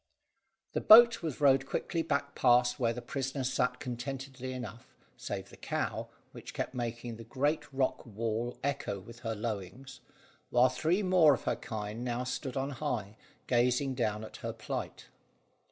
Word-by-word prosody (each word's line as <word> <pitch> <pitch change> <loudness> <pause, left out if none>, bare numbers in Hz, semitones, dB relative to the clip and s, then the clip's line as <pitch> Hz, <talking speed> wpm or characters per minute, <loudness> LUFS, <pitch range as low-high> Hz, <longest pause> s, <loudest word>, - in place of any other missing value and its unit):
The - - 0
boat 235 +1 +9
was 160 -6 -4
rowed 135 -2 +4
quickly 165 +4 -1
back 140 -3 -1
past 120 +2 +4
where 115 -2 +2
the 120 +1 -6
prisoners 135 0 -2
sat 125 0 +1
contentedly 130 +1 -5
enough; 120 -3 -8 0.2
save - - -5
the - - -13
cow, - - -2 0.2
which - - -10
kept - - -3
making 120 -1 -4
the 115 - -9
great 145 +7 -1
rock 135 -1 0
wall 115 +2 -3
echo 140 -8 -2
with 115 +5 -12
her 115 -2 -3
lowings, 115 +5 -5 0.5
while 125 +1 +5
three 160 +10 +1
more 180 -6 +6
of - - -10
her - - 0
kind 110 +1 -5
now 125 0 -1
stood 130 +1 -4
on 135 +1 -1
high, 110 -5 -3 0.3
gazing 125 +2 +2
down 110 -4 -1
at 110 - -9
her - - -4
plight. - - -5
125 Hz, 160 wpm, -31 LUFS, 115-135 Hz, 0.5 s, boat